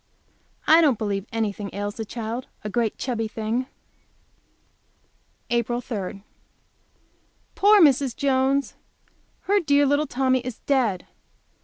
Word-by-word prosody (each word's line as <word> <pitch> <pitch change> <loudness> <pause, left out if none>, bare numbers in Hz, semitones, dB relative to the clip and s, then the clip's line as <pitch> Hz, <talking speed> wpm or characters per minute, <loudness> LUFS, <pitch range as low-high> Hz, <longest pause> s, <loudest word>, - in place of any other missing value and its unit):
I 320 +2 +7
don't 285 -8 +3
believe 200 -1 -3
anything 210 -2 -2
ails 205 0 -3
the 225 - -4
child! 230 +3 -5 0.2
a 210 - -5
great 230 -2 -1
chubby 230 -4 -2
thing! 225 +4 -3 1.8
April 240 0 0
3. 200 -5 -6 1.3
Poor 415 +1 +5
Mrs. 275 - +4
Jones! 275 0 +1 0.7
Her 405 +1 +2
dear 285 -4 +3
little 285 +2 +1
Tommy 260 0 +1
is 250 -2 -6
dead! 240 -10 0
245 Hz, 115 wpm, -24 LUFS, 215-275 Hz, 1.8 s, I